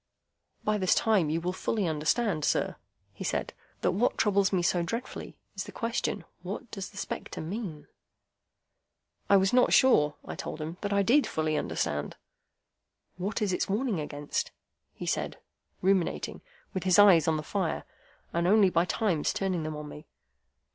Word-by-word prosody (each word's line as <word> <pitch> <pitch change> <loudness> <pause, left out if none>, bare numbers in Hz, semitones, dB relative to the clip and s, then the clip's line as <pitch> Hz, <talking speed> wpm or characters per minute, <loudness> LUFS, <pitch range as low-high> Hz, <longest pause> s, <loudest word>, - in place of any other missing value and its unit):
"By 215 0 +1
this 185 -1 +3
time 205 -9 +3
you 160 +2 0
will 180 +2 -2
fully 205 +2 -1
understand, 160 +3 0
sir," - - +1 0.4
he - - -7
said, - - -2 0.3
"that - - +2
what 215 +7 +1
troubles 200 -2 +3
me 185 -3 +1
so 175 0 +2
dreadfully 230 +9 -5 0.2
is - - -3
the - - -9
question, 230 -7 -2 0.2
What 200 +6 -6
does 195 -2 -5
the - - -15
spectre - - -5
mean?" 165 -4 -5 1.4
I 200 - +7
was 190 +2 +2
not 250 0 +5
sure, 150 - +5
I - - -5
told - - -6
him, 160 +3 -5
that 205 - -2
I 200 0 +3
did 270 +9 +4
fully 155 -1 -1
understand. 75 - -2 1.0
"What 200 +4 -2
is 195 -3 0
its - - -1
warning 215 -2 0
against?" 145 -1 -3 0.5
he - - -6
said, - - -1 0.5
ruminating, 190 -2 +1 0.3
with 185 - -2
his 185 0 +4
eyes 190 -7 +7
on 160 -1 +2
the 155 - -4
fire, 185 +1 -2 0.5
and 170 +1 +1
only 200 -1 +5
by 170 +1 +3
times 180 -5 0
turning 185 -3 -1
them 155 0 -4
on 150 0 -7
me. 150 +1 -10
185 Hz, 170 wpm, -29 LUFS, 160-205 Hz, 1.4 s, I